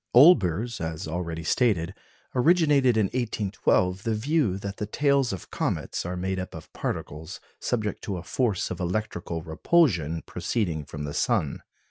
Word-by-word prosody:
Olbers, 120 - +5
as 80 -1 -4
already 85 0 -3
stated, 95 -4 +1 0.4
originated 140 -3 +4
in 110 - +4
1812 100 -5 0
the 115 0 0
view 125 - +1
that 100 0 -6
the 105 - -3
tails 140 +1 +2
of 95 -4 -7
comets - - -2
are 90 0 -3
made 95 +1 -2
up 95 - -6
of - - -11
particles 80 +5 -5 0.2
subject 110 -4 -2
to 100 -3 -2
a 85 - -6
force 110 +1 0
of 90 - -4
electrical 90 -3 -3
repulsion 80 - +2
proceeding 85 -10 -2
from 75 +1 -6
the 75 0 -4
sun. - - 0
95 Hz, 150 wpm, -26 LUFS, 85-120 Hz, 0.4 s, Olbers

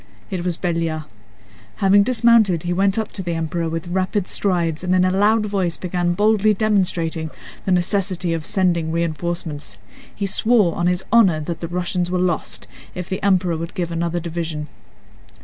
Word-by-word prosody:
It 185 -3 -2
was 175 -2 -1
Belliard. 165 -3 -1 0.7
Having 200 +1 +4
dismounted 225 -6 +4
he 175 0 -1
went 195 +2 +2
up 220 -1 -2
to 195 - -4
the 175 -2 -3
Emperor 165 +1 -2
with 165 +1 -4
rapid 185 +1 -1
strides 170 -4 -1
and 185 0 +2
in 185 0 +4
a 185 - +2
loud 210 +3 +3
voice 190 -5 -1
began 175 -1 -1
boldly 215 +1 +3
demonstrating 180 -6 0 0.4
the 190 - 0
necessity 180 -1 0
of 165 -2 -3
sending 170 -3 +1
reinforcements. 165 - -3 0.4
He 200 - -2
swore 205 -2 +3
on 175 - 0
his 180 +1 0
honor 195 -9 +5
that 165 +2 -4
the 165 - -4
Russians 175 0 -2
were 180 - 0
lost 180 -3 -1 0.3
if 180 -1 -5
the 190 - -3
Emperor 185 -3 +2
would 165 +2 -6
give 175 -3 -2
another 170 +1 -1
division. 160 -3 -4
180 Hz, 170 wpm, -21 LUFS, 165-195 Hz, 0.7 s, honor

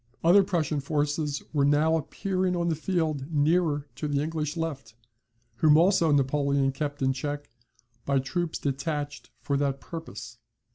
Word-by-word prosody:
Other 175 +5 +7
Prussian 165 -6 -1
forces 145 0 -1
were 145 -2 +2
now 150 +3 +3
appearing 185 +4 -1
on 170 -1 0
the 160 - +1
field 155 -4 -2
nearer 150 -1 +2
to 150 - -3
the 145 -1 0
English 155 0 -2
left; 140 -9 -4 0.6
whom 155 -1 +5
also 170 -2 +4
Napoleon 140 0 +2
kept 145 0 -4
in 130 0 +2
check, 145 0 -5 0.5
by 140 0 +1
troops 155 +6 -2
detached 145 +1 -3
for 140 - 0
that 140 -1 0
purpose. 120 - -8
150 Hz, 145 wpm, -27 LUFS, 140-165 Hz, 0.6 s, Other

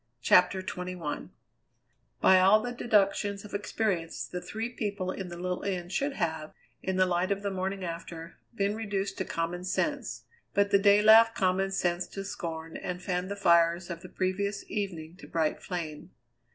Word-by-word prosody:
CHAPTER 185 +1 +5
XXI 180 -4 -5 0.9
By 190 - +7
all 195 +3 +6
the 245 - -3
deductions 205 -3 +1
of 205 - -11
experience 200 -4 -2
the 180 - -6
three 215 +6 -4
people 205 -6 -3
in 190 -1 -5
the 175 -1 -8
little 180 +1 -3
inn 180 -3 -3
should 275 +10 -1
have, 160 -7 -3 0.3
in 190 - -2
the 185 0 +4
light 180 +1 0
of 200 0 -1
the 200 - -1
morning 190 +1 -3
after, 170 0 -7 0.2
been 200 -1 0
reduced 205 -3 -3
to 190 - -1
common 170 +2 -3
sense; 285 +10 -2 0.3
but 200 0 +3
the 200 - +6
day 205 +1 +5
laughed 225 +1 +7
common 190 +1 +1
sense 175 -2 0
to 195 - -6
scorn 165 -4 -5
and 180 0 -5
fanned 180 0 -2
the 200 - -3
fires 170 -2 +3
of 170 0 -6
the - - -10
previous 200 +2 -2
evening 180 -5 -4
to - - -12
bright 160 -2 0
flame. 165 -2 -5
185 Hz, 175 wpm, -29 LUFS, 175-200 Hz, 0.9 s, By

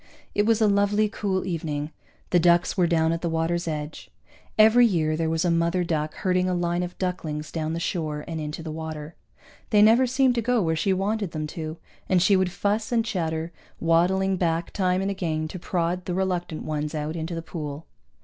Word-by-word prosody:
It 205 +1 +2
was 225 -1 +3
a 215 - +5
lovely 205 +1 +3
cool 200 -3 -2
evening; 155 -4 -3 0.4
the 175 - +5
ducks 175 +1 +3
were 180 -3 +3
down 165 -1 +2
at 165 0 -2
the 170 - -1
water's 165 +1 -1
edge. 150 -1 -5 0.5
Every 220 +3 +7
year 160 -8 +2
there 160 0 -1
was 165 +2 0
a 175 - +3
mother 170 +2 +1
duck 155 -2 -2
herding 185 0 +1
a 180 - 0
line 175 0 0
of 180 0 -5
ducklings 155 -5 -3
down 160 -1 -2
the 165 - -2
shore 155 -4 -3
and 160 -2 -4
into 150 +2 -5
the 160 - -5
water. 155 0 -6 0.6
They 210 -2 +5
never 235 +4 +6
seemed 260 0 +3
to 235 - 0
go 245 +1 +2
where 160 -5 +1
she 190 +5 +1
wanted 195 0 -1
them 155 -1 -2
to, 160 0 -5 0.3
and 185 - +4
she 195 +3 +4
would 185 -1 +1
fuss 210 +4 -1
and 230 -2 +2
chatter, 165 -5 -2 0.3
waddling 185 +3 +2
back 170 -1 0
time 185 -1 +1
and 195 - 0
again 160 -5 -2
to 185 - -7
prod 175 +1 -1
the 180 - -2
reluctant 180 -4 -2
ones 150 0 -3
out 155 +1 -3
into 165 +1 -4
the 165 - -5
pool. 150 -2 -6
175 Hz, 205 wpm, -25 LUFS, 160-190 Hz, 0.6 s, Every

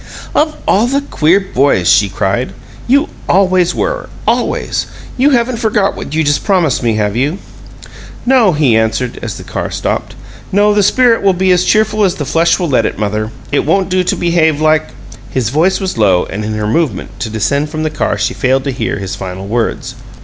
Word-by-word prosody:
"Of 305 0 +1
all 215 +5 +3
the 275 +3 0
queer 180 - +2
boys!" 140 - +1
she 100 +2 +4
cried. 100 +7 -2 0.3
"You 280 +5 +3 0.2
always 185 -2 +3
were. - - -2 0.2
Always! - - 0 0.3
You 265 +3 +3
haven't 245 -2 +1
forgot 215 -3 0
what 150 - -6
you 160 - +2
just 145 0 +1
promised 180 - +1
me, 115 -3 0
have 105 -1 -1
you?" 145 +9 0 0.9
"No," 245 -6 +4
he 145 -7 +2
answered, 110 +2 -1
as 110 -5 -5
the - - -9
car - - -4
stopped. - - -3 0.4
"No, 205 +2 +3
the 205 - +3
spirit 230 +3 +3
will 195 -1 +3
be 185 +1 +1
as 180 0 +3
cheerful 215 0 +2
as 185 -3 +2
the 145 - -4
flesh 165 +5 +2
will 175 -4 -2
let 125 -5 +2
it, - - -6
mother. 105 +1 -2 0.2
It 145 - +1
won't 185 +5 +1
do 185 0 +1
to - - 0
behave 165 -3 +1
like 155 0 +2 0.2
" 115 +1 -17
His 120 -4 +1
voice 165 +8 +1
was 190 -10 -3
low, 95 -4 +3
and 105 +3 -5
in 110 0 -3
her 105 0 -2
movement 115 - -2
to 120 - -3
descend 140 +7 -1
from 155 0 -4
the 155 - -1
car 155 - -1
she - - -1
failed 130 0 +1
to 140 - -2
hear 130 - -3
his 95 -2 -5
final 95 0 -6
words. 120 +3 -2
155 Hz, 205 wpm, -14 LUFS, -, 0.9 s, she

